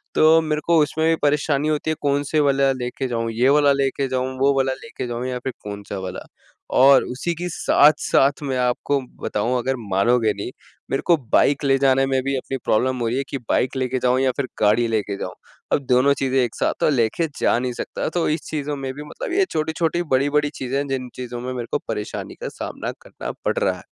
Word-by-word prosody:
तो 160 +1 +6
मेरे 155 -1 -1
को 170 -1 +4
उसमें 160 +2 0
भी 165 - +4
परेशानी 145 0 +1
होती 155 +1 -1
है, - - -1
कौन-से 145 +1 +1
वाला 140 -1 +3
लेके 130 +1 -4
जाऊँ 115 -2 -2
ये 120 +4 +2
वाला 145 0 +5
लेके 135 0 0
जाऊँ 130 0 -2
वो 140 +1 +4
वाला 135 0 +2
लेके - - -6
जाऊँ 120 +1 -3
या 125 -1 -3
फिर 130 +1 -4
कौन-सा 100 -1 -6
वाला 95 -1 -6 0.5
और 135 +1 +7
उसी 135 +7 -3
की 175 +2 -4
साथ-साथ 145 -2 +3
मैं 135 -2 -1
आपको 125 +3 0 0.2
बताऊँ 115 +5 0
अगर 130 +2 -1 0.2
मानोगें 110 +3 +3
नहीं 100 +5 -5 0.4
मेरे 135 - 0
को 170 - +5 0.2
बाइक 145 +1 +4
ले 135 -1 +3
जाने 135 0 +3
में 135 -1 +1
भी 135 +1 -1
अपनी 135 +1 -4
प्रॉब्लम 130 +4 +1
हो 120 - 0
रही 120 +3 -1
है 135 - 0
कि 140 - -3
बाइक 130 - +1
लेके 130 0 -1
जाऊँ 125 0 +3
या 130 -1 +3
फिर 140 - -1
गाड़ी 110 +3 +4
लेके 105 -3 -1
जाऊँ - - -5 0.4
अब - - +4
दोनों 130 +3 +5
चीज़ें 135 0 +1
एक 120 - -3
साथ - - 0
तो - - +4
लेके 135 +4 +1
जा - - +3
नहीं 125 0 -2
सकता - - -4
तो 175 - +1
इस 155 +2 -1
चीज़ों 150 -1 -3
में 135 -1 -4
भी 145 +2 -8
मतलब 150 - -6
ये 390 +1 +3
छोटी-छोटी 160 +2 0
बड़ी-बड़ी 145 +2 +2
चीज़ें 130 +1 -3
हैं 140 0 -1
जिन 130 -2 -3
चीज़ों 120 -1 -6
में 130 +1 -4
मेरे 120 -2 -5
को - - +2
परेशानी 105 -2 -5
का - - -3
सामना - - -5
करना - - -7
पड़ - - 0
रहा - - +1
है। - - -13
135 Hz, 220 wpm, -22 LUFS, 125-145 Hz, 0.5 s, और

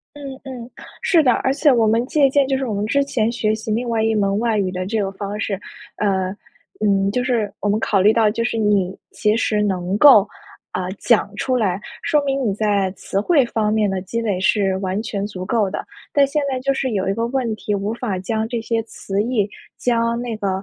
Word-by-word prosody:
嗯 280 -2 -7
嗯， 255 -3 -8 0.3
是 335 -4 +4
的， 260 - +4
而 265 - 0
且 290 0 +4
我 230 -3 +3
们 225 +2 +2
借 280 +1 +3
鉴 275 0 +3
就 270 - +1
是 265 - -2
我 220 - -2
们 200 +1 -1
之 280 +6 +1
前 230 -5 0
学 215 -2 0
习 220 0 -6
另 235 +3 -1
外 225 -1 +1
一 225 0 +2
门 200 -2 +1
外 230 -2 +1
语 190 -2 0
的 185 0 -3
这 215 +3 -1
个 195 -1 -1
方 200 +1 -5
式， 210 -2 -1 0.4
呃， 190 -3 0 0.5
嗯， 195 -2 +2
就 250 - 0
是 235 -5 0
我 205 - -1
们 205 +1 +2
考 205 -3 +1
虑 205 +3 +5
到 220 -1 +3
就 230 +2 -1
是 230 0 -1
你 205 -4 +2 0.2
其 210 0 +1
实 215 -2 +1
能 190 -2 -1
够， 235 -8 +8 0.5
啊， 185 0 -3
讲 215 -4 +2
出 255 - -1
来， 195 -5 0 0.2
说 300 - +2
明 275 -1 0
你 - - +1
在 200 -2 +1
词 195 - -2
汇 280 - +3
方 215 -2 0
面 215 -1 +2
的 190 -1 -2
积 230 +5 -3
累 205 -5 -1
是 195 -1 +2
完 190 +1 -2
全 210 -3 -3
足 185 -3 -6
够 210 -2 +1
的， - - -5 0.3
但 280 -1 +4
现 295 +2 -1
在 260 - -1
就 275 +2 0
是 265 -1 -1
有 195 -4 -1
一 195 - +1
个 230 +2 -1
问 245 -3 -1
题， 215 -1 -4
无 200 +2 -1
法 225 -6 -3
将 220 +4 -2
这 235 0 -2
些 225 0 -1
词 200 -2 -3
义， 220 -3 0 0.3
将 235 -1 +1
那 240 -2 -4
个， 200 - -1
220 Hz, 250 characters per minute, -20 LUFS, 200-245 Hz, 0.5 s, 够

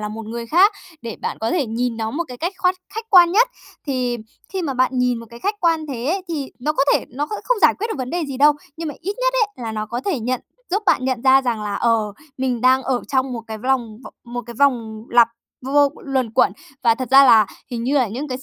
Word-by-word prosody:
là 210 - -3
một 220 +1 -7
người 230 +1 -5
khác, 370 - +5 0.3
để 230 -2 -6
bạn - - -4
có 225 - -1
thể 305 -9 0
nhìn 230 +1 -2
nó 220 -1 -2
một 340 +6 -2
cái 250 - -8
cách 345 +8 -2
khoát 365 0 +2 0.2
khách 445 0 -6
quan 350 -3 +7
nhất. 465 +6 +4 0.4
Thì 250 -3 -1 0.4
khi 380 -2 -2
mà 275 -5 -2
bạn 255 0 +2
nhìn 250 -1 +1
một 230 - -10
cái 235 - -12
khách 410 +2 -2
quan 325 -2 +1
thế 250 -4 -5
ấy, 375 +4 0
thì 290 -5 -4
nó 300 +5 -1
có 275 - +1
thể - - +1
nó 285 +5 -3
kh - - -20 0.2
không - - +1
giải - - +6
quyết 440 - -1
được 445 - -3
vấn 255 -1 -4
đề 345 -2 -1
gì 275 -2 -5
đâu. 295 +2 +6 0.2
Nhưng 325 -1 -4
mà 295 - -6
ít 400 +4 -3
nhất - - +1
ấy, 415 0 -13
là 225 - -3
nó 215 0 -3
có 240 +3 -4
thể 360 -10 0
nhận 250 +2 -1 0.3
giúp 400 +4 0
bạn 255 - +3
nhận 260 -2 -1
ra 265 0 +6
rằng 235 -4 -2
là, 205 -1 -3
ờ, 225 -3 +1 0.3
mình 255 -3 -1
đang 260 +1 +4
ở 255 -2 0
trong 265 -1 0
1 230 -2 -5
cái 220 -1 -6
v 215 - -16
lòng 240 -5 0
vò - - -9
1 245 0 -5
cái 235 - -8
vòng 230 -6 +1
lặp 235 -1 +6 0.4
vô 270 - -4
vô 285 -1 +5
luẩn 260 -5 -1
quẩn, 220 - +3 0.3
và 230 -1 +4
thật 255 +1 -5
ra 275 +1 +8
là 220 -5 +6 0.2
hình 235 -1 -3
như 270 - 0
là 250 - +2
những 265 +8 -5
cái 255 - -4
s 265 - -11
255 Hz, 280 wpm, -21 LUFS, 235-305 Hz, 0.4 s, ra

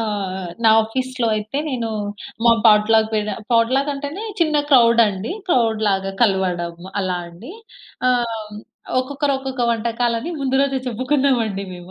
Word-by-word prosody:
ఆ! 195 -3 -3 0.2
నా - - +7
ఆఫీస్‌లో 255 +2 -3
అయితే, 215 +5 -5
నేను 240 -5 -2 0.6
మా 235 - +7
పాట్‌లక్ 220 +1 +5
పేద 210 0 -1 0.2
పాట్‌లక్ 255 +5 +2
అంటేనే, 285 +8 -6 0.2
చిన్న 310 -2 +2
క్రౌడ్ 235 -3 +6
అండి, 200 +1 -4 0.2
క్రౌడ్ 230 -8 +2
లాగా 195 -1 0
కలవడం 180 -5 0 0.3
అలా 185 -2 -1
అండి. 180 - -12 0.6
ఆహ్, 230 -4 -1 0.5
ఒక్కొక్కరు 280 +2 -1
ఒక్కొక్క 265 -1 -4
వంటకాలని 235 +4 -1
ముందు 265 -1 -1
రోజే 275 -1 +1
చెప్పుకున్నాం 260 +3 +1
అండి 200 -2 -4
మేము. 175 +1 -12
230 Hz, 135 wpm, -20 LUFS, 210-260 Hz, 0.6 s, నా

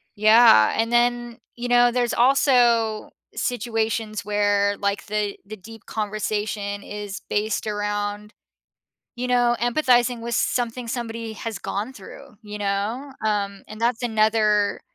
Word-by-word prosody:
Yeah, 215 - +6
and 225 +1 0
then, 240 0 +1 0.2
you 240 +1 -5
know, 245 0 +5
there's 240 -1 0
also 240 -4 +3 0.2
situations 225 -3 -2
where, 205 -1 +1
like, 200 0 -2
the 210 -1 -2
the 215 +2 -8
deep 225 +3 -14
conversation 210 -1 -3
is 205 -1 -7
based 210 +1 -1
around, 205 0 -3 0.8
you 250 +1 -3
know, 245 -1 +3
empathizing 245 -1 +2
with 235 -1 -3
something 240 0 -1
somebody 230 -1 -5
has 220 -1 -6
gone 210 +7 -4
through, 210 -2 -13
you 210 0 -7
know, 205 +7 -2
um, 200 -2 -2
and 215 +1 -10
that's 240 +1 0
another 215 -2 +2
220 Hz, 130 wpm, -23 LUFS, 205-240 Hz, 0.8 s, Yeah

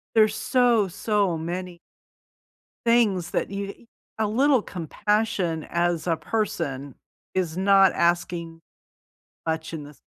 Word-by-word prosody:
There's 215 -1 +5
so, 240 -4 +3
so 200 -2 0
many 175 +2 -5 1.1
things 215 -7 +3
that - - -1
you 200 +3 -6 0.3
a 220 - +2
little 260 +3 +3
compassion 185 -1 -1
as 170 -1 0
a 170 - +2
person 145 - -3 0.4
is 175 -3 -1
not 195 0 +5
asking 170 -1 0 0.8
much 160 0 -2
in 155 -2 -5
this 145 0 -13
185 Hz, 110 wpm, -25 LUFS, 165-215 Hz, 1.1 s, There's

